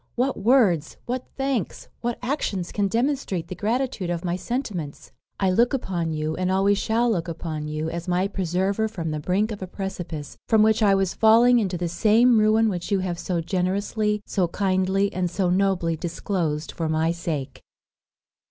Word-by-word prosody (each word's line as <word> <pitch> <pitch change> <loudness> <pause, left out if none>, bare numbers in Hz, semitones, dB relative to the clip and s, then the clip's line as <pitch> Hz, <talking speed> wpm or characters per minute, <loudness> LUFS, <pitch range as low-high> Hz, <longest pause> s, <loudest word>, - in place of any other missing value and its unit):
what 255 +2 +1
words, 200 - +2
what 250 +1 -3
thanks, 270 -6 -2
what 240 0 -2
actions 230 - -2
can 205 -1 0
demonstrate 230 - -1
the 185 - -5
gratitude 220 -1 -1
of 175 +1 -3
my 175 0 0
sentiments! 185 - -4 0.3
I 190 -2 +2
look 235 +8 +3
upon 175 -9 -2
you, 155 0 -2
and 185 +2 -1
always 195 +1 +3
shall 235 +2 +1
look 175 -5 -1
upon 160 -2 -4
you, 155 +1 -3
as 170 +1 -5
my 180 +2 +1
preserver 195 +3 0
from 170 -7 -4
the 155 - -2
brink 195 +8 0
of 205 - -6
a 185 - -4
precipice, 180 -6 -6
from 220 -2 +5
which 220 +1 +3
I 200 -2 +5
was 195 -1 0
falling 235 +2 +5
into 190 -5 -1
the 175 0 -2
same 220 +7 +4
ruin 215 +1 +4
which 180 -2 -3
you 195 -2 +2
have 175 -2 -3
so 175 -2 -1
generously, 200 +4 -1
so 185 -3 0
kindly, 190 +2 0
and 180 -1 -1
so 180 0 0
nobly 185 -3 +1
disclosed 165 -2 -2
for 165 -2 -3
my 160 +1 +1
sake." 165 -5 -4
190 Hz, 180 wpm, -24 LUFS, 170-220 Hz, 0.3 s, from